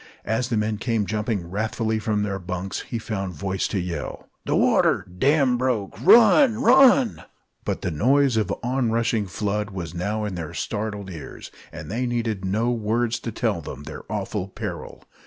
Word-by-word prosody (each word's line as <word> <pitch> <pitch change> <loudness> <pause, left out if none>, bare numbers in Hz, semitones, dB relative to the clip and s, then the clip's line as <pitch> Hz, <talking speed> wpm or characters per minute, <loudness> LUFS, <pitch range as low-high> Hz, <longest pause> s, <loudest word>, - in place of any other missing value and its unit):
As 120 +3 -1
the 115 - 0
men 105 0 -1
came 115 -4 0
jumping 105 -3 -2
wrathfully 110 +3 -1
from 105 -1 0
their 100 -1 -2
bunks, 90 +1 -4
he 115 - -5
found 100 -5 -4
voice 95 +5 -2
to 100 - -2
yell: 85 -4 -5 0.2
"The - - +1
water! - - +3
Dam 135 -3 +3
broke! 125 -6 -1
Run! 235 - +7
Run!" 260 -1 +5 0.4
But - - -2
the - - -1
noise 130 - +3
of 110 -3 +1
the 100 - -3
onrushing 115 -4 0
flood 105 +2 -2
was 90 -4 -6
now 105 +5 -2
in 105 - -3
their 85 -4 -6
startled 105 -2 -4
ears, 80 -4 -9 0.2
and - - -8
they 125 +3 -1
needed 115 -5 -2
no 110 +6 0
words 115 +1 0
to 115 - -5
tell 110 -5 -1
them 70 -1 -8
their 75 +1 -8
awful 100 -2 -3
peril. 95 - -7
110 Hz, 175 wpm, -24 LUFS, 95-120 Hz, 0.4 s, Run